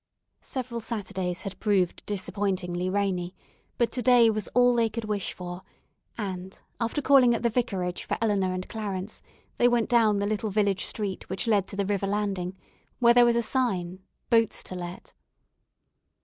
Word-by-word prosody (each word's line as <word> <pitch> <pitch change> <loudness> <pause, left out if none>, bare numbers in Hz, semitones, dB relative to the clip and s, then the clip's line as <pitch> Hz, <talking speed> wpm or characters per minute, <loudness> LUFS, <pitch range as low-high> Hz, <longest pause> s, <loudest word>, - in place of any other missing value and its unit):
Several 250 -3 -4
Saturdays 190 -5 -3
had 195 - -7
proved 195 -5 +1
disappointingly 185 -3 -2
rainy, 185 -2 -1 0.4
but 235 -2 +1
to 250 - -2
day 240 -1 +6
was 215 -1 -3
all 245 0 +5
they 230 -1 +2
could 230 0 -5
wish 210 -2 -2
for, 180 0 -7 0.6
and 190 -3 -5 0.2
after 240 +5 -1
calling 260 -4 +6
at 230 - -4
the 235 - +2
vicarage 195 -7 -2
for - - -2
Eleanor 200 -4 +1
and 185 0 -4
Clarence, 205 -2 -5 0.4
they 240 - +5
went 240 -2 +2
down 225 -4 +4
the 200 - 0
little 215 +1 -1
village 200 -2 +1
street 200 -3 -3
which 190 +1 -3
led 205 -4 +2
to - - -7
the 200 0 0
river 200 0 -1
landing, 195 -3 -2 0.4
where 235 -1 +5
there 245 0 +7
was 235 0 +3
a 235 - +2
sign, 190 -8 -1 0.3
"Boats 230 -2 +3
to - - -9
let." 175 0 -7
205 Hz, 170 wpm, -27 LUFS, 185-230 Hz, 0.6 s, there